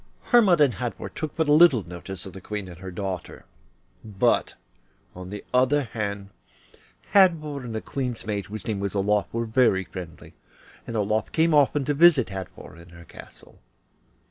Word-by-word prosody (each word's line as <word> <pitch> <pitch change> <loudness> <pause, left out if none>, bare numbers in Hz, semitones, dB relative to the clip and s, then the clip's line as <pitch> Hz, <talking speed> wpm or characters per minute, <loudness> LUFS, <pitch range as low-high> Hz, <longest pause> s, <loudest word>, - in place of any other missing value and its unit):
Hermod 210 -9 +5
and 140 -5 +4
Hadvor 120 +5 -5
took 155 -2 -5
but 160 -2 0
little 150 - +6
notice 90 +1 -7
of 95 - -9
the 95 - -10
Queen 105 0 -5
and 85 -2 -11
her 95 0 -8
daughter, 95 -1 -6 0.6
but, 105 -3 0 0.6
on 90 0 -9
the 105 +1 -7
other 130 +3 +3
hand, 100 -4 -5 0.8
Hadvor 165 -7 +3
and 115 -2 -6
the 110 - -3
Queen's 125 -4 -4
maid, 100 -2 -3
whose 105 -1 -8
name 105 -3 -2
was 100 0 -3
Olof, 100 +1 0
were 115 0 -2
very 110 -4 +2
friendly, 90 -3 -10 0.5
and 115 - -5
Olof 110 +1 -1
came 165 0 +2
often 145 -1 +3
to 145 - 0
visit 145 - +5
Hadvor 95 -3 -9
in 85 - -16
her 85 0 -14
castle. - - -15
110 Hz, 170 wpm, -25 LUFS, 95-140 Hz, 0.8 s, little